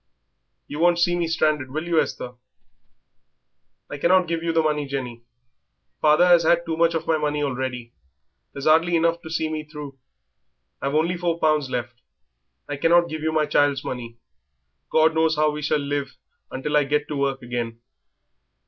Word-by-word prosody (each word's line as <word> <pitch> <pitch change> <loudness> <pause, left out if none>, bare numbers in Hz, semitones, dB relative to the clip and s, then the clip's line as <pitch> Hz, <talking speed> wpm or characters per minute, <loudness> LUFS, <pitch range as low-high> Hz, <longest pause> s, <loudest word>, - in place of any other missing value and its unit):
You 145 - -6
won't 175 +1 +4
see 175 +1 +2
me 170 -1 -1
stranded, 155 -4 0
will 155 +4 -4
you, 170 -2 +3
Esther?" 125 - -5 1.6
"I 145 - -7
cannot 180 +3 +3
give 165 0 -2
you 165 0 -1
the 165 0 +2
money, 150 -2 -1
Jenny. 125 -4 -5 0.8
Father 155 +3 +5
has 175 -1 +6
had 170 +1 +2
too 165 -1 -2
much 165 0 +2
of 165 - -2
my 160 -1 +1
money 150 0 -1
already; 125 -3 -4 0.6
there's 140 - -7
'ardly 165 +3 +4
enough 170 +1 +1
to 160 - -10
see 160 0 -1
me 155 -1 -4
through. 150 -3 -10 0.8
I've 140 +1 -2
only 170 +3 +1
four 170 -1 -1
pounds 155 -4 +1
left. 120 -1 -5 0.7
I 145 - -4
cannot 170 +3 +3
give 155 -1 -5
you 160 0 0
my 155 -1 +1
child's 145 -2 +1
money; 120 -2 -6 0.7
God 160 0 +4
knows 160 0 +2
how 150 0 +2
we 150 0 -6
shall 150 +1 +1
live 140 -2 -3 0.3
until 150 +3 -3
I - - +5
can - - -13
get 150 0 0
to 150 - -3
work 135 -2 -1
again." 120 -1 -4
155 Hz, 180 wpm, -23 LUFS, 140-165 Hz, 1.6 s, has